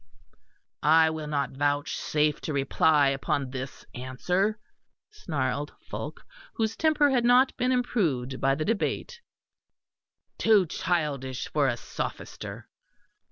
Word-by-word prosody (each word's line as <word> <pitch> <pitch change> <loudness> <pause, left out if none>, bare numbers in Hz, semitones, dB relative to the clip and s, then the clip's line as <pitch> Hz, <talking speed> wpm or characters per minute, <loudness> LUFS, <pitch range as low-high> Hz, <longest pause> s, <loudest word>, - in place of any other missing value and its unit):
"I 160 +2 +5
will 155 -1 -5
not 145 -2 -1
vouchsafe 145 +1 0
to 155 - -3
reply 140 +1 +3
upon 135 -1 -1
this 130 0 -7
answer," 180 - -1 0.5
snarled 145 - -3
Fulke, - - -7 0.3
whose 220 -1 0
temper 305 -3 +3
had 250 -3 +2
not 250 +2 +5
been 255 0 +1
improved 160 - 0
by 135 0 +3
the 155 +2 -2
debate 470 - -2 1.2
"too 215 -4 +5
childish 150 -7 -2
for 145 -2 +2
a 120 -2 0
sophister!" - - -6
150 Hz, 115 wpm, -27 LUFS, 135-220 Hz, 1.2 s, I